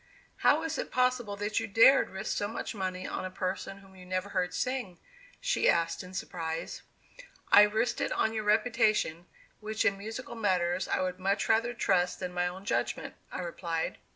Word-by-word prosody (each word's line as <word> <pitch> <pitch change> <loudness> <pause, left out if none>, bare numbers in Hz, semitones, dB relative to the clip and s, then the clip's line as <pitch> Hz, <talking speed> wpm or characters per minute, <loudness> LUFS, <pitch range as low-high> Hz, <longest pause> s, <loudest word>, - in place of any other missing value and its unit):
"How - - +4
is 320 -1 -3
it - - -3
possible 250 -4 +1
that 205 +2 -1
you 225 - -3
dared 230 +6 +6
risk 190 0 -3
so 205 - -1
much 225 - -5
money 185 -3 -3
on - - -4
a 185 - -3
person 185 +1 -4
whom 190 0 -18
you 185 - -13
never 185 +2 -3
heard 180 -3 -1
sing?" 230 -1 -2 0.4
she - - +2
asked 165 0 +1
in 180 +1 -11
surprise. 165 -2 -4 0.7
"I - - +10
risked 215 +3 +2
it - - 0
on 220 - +1
your 215 -1 -2
reputation, 215 -6 +2 0.3
which 215 0 -2
in 195 -2 +2
musical 225 +4 -6
matters 185 -5 0
I - - 0
would 185 0 -3
much 195 +2 0
rather 230 +2 +2
trust 180 -5 +1
than 180 -1 -4
my 180 0 +1
own 185 +2 -7
judgment," - - -1 0.2
I - - -4
replied. 170 -2 -3
195 Hz, 185 wpm, -30 LUFS, 180-220 Hz, 0.7 s, I